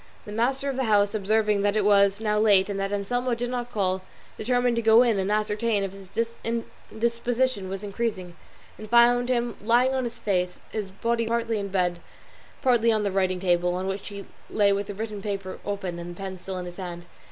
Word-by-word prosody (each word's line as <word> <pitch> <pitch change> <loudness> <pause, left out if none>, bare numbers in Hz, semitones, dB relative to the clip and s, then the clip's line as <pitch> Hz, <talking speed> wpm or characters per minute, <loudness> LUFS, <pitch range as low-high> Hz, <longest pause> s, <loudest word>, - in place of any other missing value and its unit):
The 210 - -8
master 260 +6 0
of 270 -2 -2
the 265 - 0
house 205 -2 +3
observing 210 0 +1
that 205 +1 +1
it 210 -2 +2
was 200 -1 +4
now 210 -1 +1
late 205 -2 +4
and 195 - -3
that 195 0 -2
Anselmo 245 +5 -1
did 240 +1 -3
not 245 -1 -3
call, 190 -3 0 0.3
determined 245 +1 +1
to - - +2
go 225 +2 +6
in 230 -5 +2
and 190 +2 -1
ascertain 210 0 +1
if 195 -1 -4
his 215 +4 -4 0.6
indisposition 235 -1 -1
was 195 +1 -5
increasing, 200 -4 -3 0.4
and 215 - -9
found 240 +1 +5
him 240 -2 0
lying 240 +4 +3
on 260 -1 0
his 235 0 -5
face, 180 -5 -1
his 210 -3 -3
body 230 +4 -1
partly 230 -1 0
in 200 - -3
the - - -11
bed, 180 -2 0 0.6
partly 235 -3 +4
on 215 -1 +1
the 200 - 0
writing 185 -1 +1
table, 175 -1 +1
on 185 +1 -3
which 195 +1 -4
he 200 -1 -7 0.2
lay 205 -2 +3
with 200 0 -2
the 205 - -6
written 215 -1 -5
paper 195 -2 -4
open 190 -4 -4
and 175 0 -7
the - - -19
pen 190 -1 -6
still 190 +1 -5
in 180 - -5
his 175 0 -9
hand. 175 -2 -6
210 Hz, 215 wpm, -26 LUFS, 195-235 Hz, 0.6 s, go